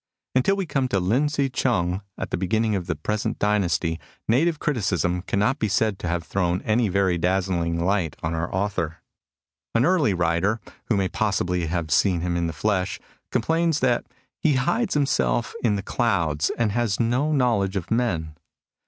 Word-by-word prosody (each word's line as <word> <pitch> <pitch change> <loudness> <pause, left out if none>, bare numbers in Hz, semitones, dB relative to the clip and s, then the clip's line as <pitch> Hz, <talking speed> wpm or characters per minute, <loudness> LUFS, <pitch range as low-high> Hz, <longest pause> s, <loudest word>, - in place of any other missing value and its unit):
Until 130 +10 +3
we 195 -1 -2
come 135 -5 0
to 100 -6 0
Lin 115 +11 +2
Hsi 140 -2 0
chung 95 -7 0 0.2
at - - -5
the - - 0
be 95 - -2
ginning 110 +2 +1
of 90 -2 -3
the 80 - -1
present 105 +8 -2
dynasty, 85 -5 +1 0.3
native 155 +8 +2
criticism 95 - 0
cannot 105 +9 0
be 110 - +1
said 105 0 +1
to - - -4
have 85 0 -1
thrown 90 +1 -1
any 110 0 +2
very 95 -2 +1
dazzling 90 -2 0
light 90 -2 0
on 80 +1 -1
our 80 +1 -2
author. 95 -4 -1 0.8
An 115 +2 +4
early 155 - +3
writer, 85 +6 +1 0.3
who 110 - +1
may 95 -1 +1
possibly 90 -5 0
have 80 -1 -2
seen 90 +4 +3
him 85 0 -1
in 85 -1 0
the - - -2
flesh, 95 +4 -1 0.3
complains 165 -1 +1
that 125 -2 +1 0.2
*' - - -47
he 155 - +3
hides 215 - +1
himself 65 - +1
in 110 -3 +3
the 100 - -3
clouds 85 -9 0
and 115 -3 +1
has 115 -2 0
no 125 +6 +1
knowledge 115 -9 +1
of 95 0 -4
men." 95 -10 0
100 Hz, 180 wpm, -24 LUFS, 85-120 Hz, 0.8 s, An